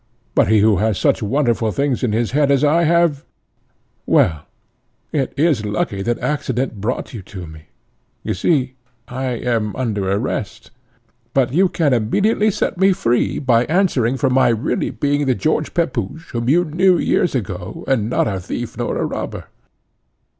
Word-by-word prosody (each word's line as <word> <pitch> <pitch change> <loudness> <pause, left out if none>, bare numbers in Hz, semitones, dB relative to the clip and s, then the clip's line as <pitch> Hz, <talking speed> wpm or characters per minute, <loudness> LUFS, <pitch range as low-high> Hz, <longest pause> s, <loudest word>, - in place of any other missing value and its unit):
But - - +3
he 110 0 +4
who 105 -2 +4
has 105 +1 0
such - - +1
wonderful 115 -1 0
things 140 +3 -1
in 125 - 0
his 115 +1 0
head 145 +1 +2
as 140 0 +3
I 165 +3 +3
have 165 -3 +2 0.8
Well, 80 -4 +2 0.6
it 135 -4 -1
is 145 -7 +2
lucky 105 -1 -2
that 120 +3 -1
accident 130 -6 -2
brought 120 +5 -3
you 110 - -6
to 95 -1 -9
me! 80 -1 -13 0.6
You - - -2
see 130 - 0 0.3
I 130 +2 -4
am 115 -4 -1
under 105 -7 -2
arrest, 105 0 -3 0.6
but 130 -2 +2
you 185 +4 +3
can 155 -6 +1
immediately 205 - +2
set 185 - -2
me 190 0 +5
free, 120 -7 0
by 120 -3 +2
answering 145 - +1
for 135 -1 +1
my 130 -2 +4
being 115 - -4 0.3
really 145 0 0
the 130 -3 +1
George 155 +1 -1
Pepusch, 160 - -2
whom 120 +1 -2
you 175 +5 +3
knew 175 +3 +3
years 175 - +1
ago, 95 -6 -5
and 115 -5 +1
not - - +1
a 95 -3 -2
thief 90 - -5
nor - - -2
a - - 0
robber." - - -5
125 Hz, 170 wpm, -19 LUFS, 110-150 Hz, 0.8 s, me